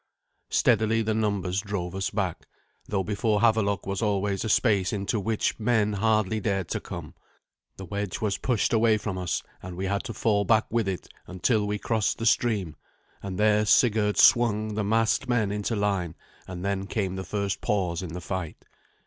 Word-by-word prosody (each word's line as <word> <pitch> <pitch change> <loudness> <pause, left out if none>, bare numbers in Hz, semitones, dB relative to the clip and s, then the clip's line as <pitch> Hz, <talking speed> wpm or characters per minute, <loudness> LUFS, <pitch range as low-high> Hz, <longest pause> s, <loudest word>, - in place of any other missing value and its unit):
Steadily 110 +1 +2
the 110 0 0
numbers 100 -4 -1
drove 95 -4 -4
us 95 0 -2
back, 95 -5 -3 0.4
though 100 -2 -1
before 105 +1 0
Havelok 110 -3 +2
was 100 +2 -3
always 100 -2 0
a 110 - -2
space 100 -6 +2
into 105 +2 -1
which 110 +3 -1
men 110 -2 +2
hardly 110 0 +1
dared 95 -4 -1
to - - -1
come. - - -8 0.6
The 95 - -7
wedge 100 +1 -4
was 105 -2 -1
pushed 120 -4 0
away 110 -1 +4
from 105 -3 -4
us, 90 -2 -2 0.2
and 90 -1 -8
we 95 - -2
had 100 +2 -1
to 115 - -5
fall 105 -3 +1
back 110 +1 +3
with 115 -2 +1
it, 95 -2 -4 0.2
until 105 +4 0
we 105 0 -1
crossed 110 0 0
the 115 - -4
stream; 105 -9 +1 0.4
and 95 -2 -5
there 105 0 +3
Sigurd 105 -1 +3
swung 110 -2 +4
the 105 0 -1
massed 115 +5 +1
men 110 -5 +1
into 105 +2 -2
line, 100 -5 -1 0.3
and 90 0 -6
then 100 -1 -2
came 95 -2 -2
the 95 - -4
first 100 -1 -3
pause 90 -5 -1
in 90 -3 -6
the 90 - -5
fight. 90 -2 -4
105 Hz, 185 wpm, -26 LUFS, 95-110 Hz, 0.6 s, away